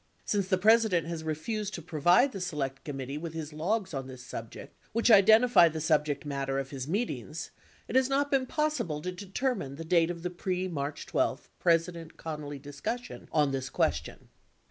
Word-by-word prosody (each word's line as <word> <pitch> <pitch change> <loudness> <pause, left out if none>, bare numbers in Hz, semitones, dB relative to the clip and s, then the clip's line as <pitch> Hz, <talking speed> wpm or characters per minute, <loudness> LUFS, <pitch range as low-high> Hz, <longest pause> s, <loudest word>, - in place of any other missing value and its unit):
Since 200 -3 0
the 185 -1 +2
President 215 -3 +4
has 165 -1 -4
refused 195 +7 -3
to 170 - -6
provide 175 - +4
the 195 - -6
Select 145 -7 -3
Com 145 -2 -5
mittee 135 +3 -5
with 165 -1 -6
his 155 -1 -5
logs 190 +4 -1
on 135 -1 -4
this 130 -1 -10
subject 115 -2 -8 0.2
(which 230 +1 +3
identify 220 -2 +7
the 160 0 -5
subject 150 -2 +1
matter 135 -1 -2
of 135 -1 -3
his 135 -2 -5
meetings), 205 +9 -3 0.4
it - - -5
has 260 0 +4
not 285 +1 +1
been 265 -2 +2
possible 300 - -1
to 180 - -2
determine 190 - -3
the 165 +3 -7
date 165 0 +3
of 170 -1 -5
the 180 - -2
pre 185 +1 -2
March 145 -4 -4
12 - - -1
President 165 -1 +1
Connally 150 -3 -6
discussion 145 - -6
on 150 -3 +3
this 135 -1 -3
question. - - -1
165 Hz, 185 wpm, -29 LUFS, 145-205 Hz, 0.4 s, identify